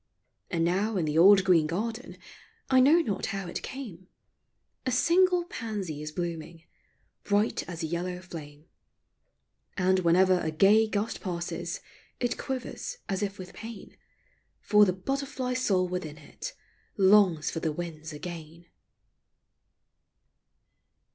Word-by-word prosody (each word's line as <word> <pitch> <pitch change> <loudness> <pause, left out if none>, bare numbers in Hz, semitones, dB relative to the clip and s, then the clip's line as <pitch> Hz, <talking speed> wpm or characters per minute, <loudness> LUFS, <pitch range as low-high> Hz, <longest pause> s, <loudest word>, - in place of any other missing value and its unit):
And 165 -1 0
now 200 +5 0
in 170 - +1
the 155 +1 +1
old 195 +2 +8
green 170 -5 +4
garden, 225 - -4 0.3
— - - -31
I 260 - +6
know 295 +7 +6
not 205 - -2
how 195 -2 -4
it 175 - -5
came, 220 -10 -8 0.4
— - - -49
A - - +1
single 355 +7 +3
pansy 205 - -5
is 150 0 -5
blooming, 165 -1 -5 0.6
Bright 205 +2 +1
as 170 -1 -5
a - - 0
yellow 175 +2 -3
flame. 155 -4 -10 1.1
And 185 0 +3
Avhenever 185 +1 +4
a 160 - 0
gay 200 +8 +5
gust 215 +1 -2
passes, 175 -3 -4 0.4
It 245 -1 -1
quivers 265 - -5
as 195 -1 -2
if 200 -1 -2
with 185 -1 -9
pain, 225 -1 -10 0.6
For 210 0 +5
the 185 - +1
butterfly 270 +5 -3
soul 195 -8 +1
within 170 -4 -5
it 150 - -8 0.4
Longs 190 -5 +4
for 165 - -3
the 160 -1 -1
winds 160 -1 -6
again. 165 +1 -8
185 Hz, 135 wpm, -28 LUFS, 170-220 Hz, 1.1 s, old